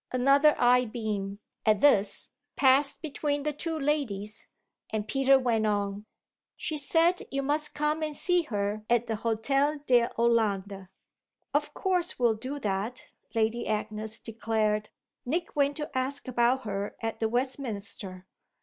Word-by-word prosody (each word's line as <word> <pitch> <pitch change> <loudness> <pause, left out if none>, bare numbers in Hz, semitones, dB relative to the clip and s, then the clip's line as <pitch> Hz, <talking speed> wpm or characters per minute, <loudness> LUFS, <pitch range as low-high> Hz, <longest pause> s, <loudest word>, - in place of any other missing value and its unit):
Another 275 +4 +4
eye 250 +1 +4
beam, 210 -4 -3 0.3
at 215 -2 +3
this, 210 -7 +3 0.2
passed 275 +3 +3
between 290 -1 -2
the 300 0 -1
two 325 +2 -3
ladies 270 -9 -2 0.4
and 215 -1 -3
Peter 270 +3 +4
went 230 -4 +1
on: 205 0 -2 0.5
"She 310 - -3
said 330 +5 +3
you 275 +1 -2
must 300 +2 0
come 300 +1 0
and 305 -1 -2
see 355 +3 +2
her 210 -7 -2
at 240 0 +3
the 225 - -2
Hôtel 275 +7 0
de 240 -3 +4
Hollande." 205 -5 +1 0.7
"Of - - 0
course 360 -3 0
we'll 240 -2 +3
do 255 +6 -5
that," 210 +4 -3 0.2
Lady 225 +1 0
Agnes 215 0 -3
declared. 215 -2 -1 0.3
"Nick 335 +7 -2
went 285 0 +2
to 295 -3 -6
ask 260 +2 -2
about 250 +1 +2
her 200 -2 -4
at 225 0 -3
the 220 - +1
Westminster." 220 -7 -4
240 Hz, 140 wpm, -28 LUFS, 215-285 Hz, 0.7 s, Another